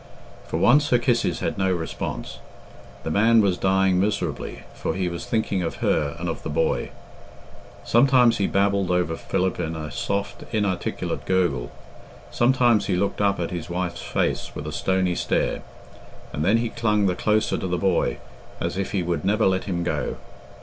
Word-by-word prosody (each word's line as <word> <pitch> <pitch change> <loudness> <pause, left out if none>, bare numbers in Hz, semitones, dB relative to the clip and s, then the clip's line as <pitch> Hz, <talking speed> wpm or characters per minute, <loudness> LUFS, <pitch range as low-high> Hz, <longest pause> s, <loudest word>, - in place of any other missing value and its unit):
For - - -2
once 145 +4 +4
her 120 - +5
kisses 120 -1 0
had - - -2
no 95 -1 +2
response. 85 -3 -4 0.6
The 80 - -3
man 115 +5 +5
was 100 -4 +3
dying 95 0 +2
miserably, 100 +2 -2
for - - -3
he 95 -1 -1
was 85 -1 -5
thinking 110 -4 0
of 85 - -3
her 75 0 0
and 85 +1 -4
of 85 - -3
the - - -5
boy. - - 0 0.9
Sometimes 125 -1 +4
he 100 - +1
babbled 100 -1 +1
over 90 -2 +1
Philip 95 +3 -1
in 80 +1 -2
a 75 -1 -6
soft, 100 0 -3
inarticulate 100 -4 -2
gurgle; 85 -10 +1 0.6
sometimes 120 -2 +3
he 95 - +1
looked 100 +3 -1
up 100 -1 +2
at 85 - -2
his 85 -3 -5
wife's 90 0 -3
face - - -2
with - - -6
a 75 - -4
stony 95 +2 0
stare, - - 0 0.7
and 75 - -2
then 100 +7 +4
he 115 0 -1
clung 105 -3 +1
the 90 - +2
closer 105 +4 +1
to - - -3
the 90 0 -1
boy, 90 -10 +1 0.4
as - - -2
if 100 - -3
he 95 -3 +1
would 85 0 -2
never 105 +3 +2
let 95 -1 +1
him 85 -3 -2
go. 85 - -2
95 Hz, 175 wpm, -24 LUFS, 90-105 Hz, 0.9 s, her